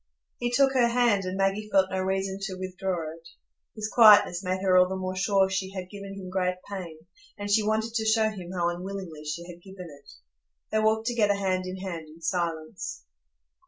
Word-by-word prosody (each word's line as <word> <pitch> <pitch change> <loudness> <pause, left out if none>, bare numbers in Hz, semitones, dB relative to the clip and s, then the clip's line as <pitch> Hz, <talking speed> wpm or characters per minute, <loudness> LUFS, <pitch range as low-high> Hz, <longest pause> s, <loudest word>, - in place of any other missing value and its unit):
He 240 - 0
took 270 +2 +3
her 250 -3 +4
hand, 235 -5 +2
and 185 +1 -3
Maggie 195 +2 0
felt 190 -1 +3
no 190 - -1
reason 190 +1 -1
to 190 -1 -5
withdraw 185 -3 -3
it; 165 0 -15 0.5
his 215 -1 -3
quietness 205 -5 +6
made 185 +1 -2
her 185 -1 +3
all 180 0 +6
the 190 - -2
more 185 0 -3
sure 195 +1 +3
she 190 0 -2
had 185 -1 -6
given 200 -1 -8
him 185 -2 -8
great 180 -1 0
pain, 185 -5 -6 0.4
and 205 0 -4
she 215 +1 +5
wanted 220 +2 -1
to 220 -1 -1
show 220 0 +3
him 185 -4 -8
how 175 -2 0
unwillingly 175 -3 -6
she 155 +3 -4
had 175 0 -11
given 185 -3 -10
it. - - -17 0.6
They 215 - +2
walked 220 +1 +2
together 220 -4 +2
hand 185 -2 -1
in 185 +1 -5
hand 175 -4 -6
in 155 +2 -15
silence. 170 - -3
190 Hz, 200 wpm, -27 LUFS, 180-210 Hz, 0.6 s, quietness